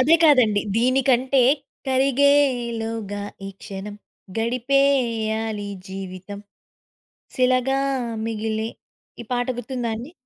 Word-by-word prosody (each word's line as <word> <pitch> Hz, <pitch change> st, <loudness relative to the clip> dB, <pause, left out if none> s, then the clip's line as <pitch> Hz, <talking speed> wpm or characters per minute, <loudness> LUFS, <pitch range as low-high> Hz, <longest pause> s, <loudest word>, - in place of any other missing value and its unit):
అదే 300 Hz, +6 st, +5 dB
కాదండి. 250 Hz, -9 st, +5 dB, 0.2 s
దీనికంటే 255 Hz, +1 st, +3 dB, 0.5 s
కరిగేలోగా 245 Hz, -6 st, +1 dB, 0.2 s
ఈ -, -, -5 dB
క్షణం 200 Hz, +1 st, -7 dB, 0.4 s
గడిపేయాలి 230 Hz, -4 st, +1 dB, 0.2 s
జీవితం 190 Hz, +1 st, -7 dB, 1.0 s
శిలగా 255 Hz, +1 st, +2 dB, 0.5 s
మిగిలి 220 Hz, 0 st, -2 dB, 0.5 s
ఈ -, -, -17 dB
పాట 245 Hz, 0 st, 0 dB
గుర్తుందాండి? 240 Hz, +1 st, -4 dB
235 Hz, 75 wpm, -23 LUFS, 220-265 Hz, 1.0 s, అదే